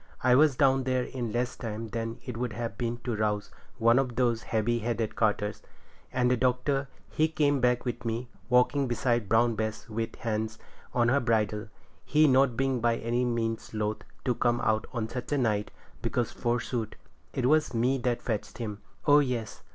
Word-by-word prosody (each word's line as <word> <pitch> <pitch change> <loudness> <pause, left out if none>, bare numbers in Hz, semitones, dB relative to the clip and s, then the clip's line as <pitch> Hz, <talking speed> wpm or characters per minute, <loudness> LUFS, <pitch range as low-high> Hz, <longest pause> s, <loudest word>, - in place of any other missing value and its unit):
I 125 0 +5
was 145 +1 +5
down 135 -1 +3
there 130 -1 +1
in 120 -3 -4
less 125 +2 -1
time 115 -1 -5
than 115 0 -3
it 125 - -5
would 120 -1 -2
have 115 +1 -4
taken 120 -1 -1
to 120 -3 -2
rouse 105 -1 -1 0.3
one 115 +2 +5
of 130 -3 -1
those 120 -2 +2
heavy 115 +2 0
headed 115 -1 -2
carters; 105 -1 0 0.5
and 125 -1 +2
Doctor, 130 +3 +1 0.2
he 155 - +2
come 145 -3 +2
back 125 0 +2
with 120 -1 -3
me, 115 +1 -2 0.2
walking 125 +3 +3
beside 120 -3 0
Brown 115 +1 +4
Bess 110 0 -3
with 115 +1 -3
his - - -17
hand 110 -1 -2 0.3
on 120 -1 +2
her 140 +3 +4
bridle, 110 -3 0 0.4
he 155 +1 +4
not 130 -3 +4
being 135 -1 +1
by 120 0 +3
any 120 +2 0
means 115 -2 -2
loth 105 0 -1 0.3
to 125 - +2
come 120 0 +1
out 110 0 +1 0.2
such 125 +4 -4
a - - +2
night, 105 -5 +1 0.3
because, 120 -2 -1
forsooth, 120 -1 -2 0.4
it 130 - -1
was 155 -1 +3
me 125 +4 +2
that 120 -1 -1
fetched 110 -4 -3
him. 105 -3 -5 0.2
Oh 145 0 +7
yes! 125 -6 -2
120 Hz, 180 wpm, -29 LUFS, 115-125 Hz, 0.5 s, Oh